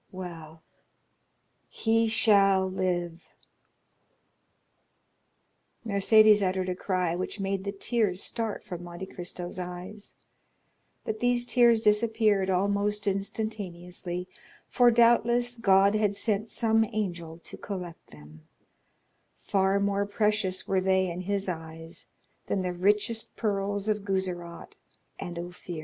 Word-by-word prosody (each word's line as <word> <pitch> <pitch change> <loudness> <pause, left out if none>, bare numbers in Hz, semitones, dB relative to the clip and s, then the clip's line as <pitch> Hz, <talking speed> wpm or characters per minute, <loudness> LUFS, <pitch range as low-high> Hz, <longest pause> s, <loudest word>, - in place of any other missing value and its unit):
Well, 165 -4 -9 1.1
he 225 0 +1
shall 195 -4 +4
live!" 175 -2 -3 2.6
Mercédès 215 0 +5
uttered 185 -1 0
a 180 - -2
cry 180 -3 -1
which 185 +3 -4
made 195 0 -2
the 200 - -2
tears 200 -2 0
start 225 -2 -3
from 180 -5 -7
Monte 175 +2 -7
Cristo's 180 -1 -7
eyes; 180 +4 -8 0.9
but 215 0 -3
these 245 0 +1
tears 235 -2 +4
disappeared 210 -2 +2
almost 200 +2 0
instantaneously, 185 -3 -4 0.4
for, 245 -1 +4
doubtless, 240 +1 +3
God 195 -2 +4
had 210 -2 +1
sent 215 +1 0
some 225 -1 +2
angel 175 -7 -4
to - - -10
collect 180 -4 -7
them—far 80 - -5
more 200 0 0
precious 210 -2 0
were 190 -1 +1
they 190 -1 +1
in 175 +2 -5
his 195 +1 -2
eyes 165 -1 -7 0.4
than 190 - -1
the 180 -1 -2
richest 210 +5 0
pearls 205 -1 -2
of 210 -1 0
Guzerat 180 -3 -4 0.4
and 175 -1 -6
Ophir. 175 -1 -7
195 Hz, 110 wpm, -27 LUFS, 180-215 Hz, 2.6 s, Mercédès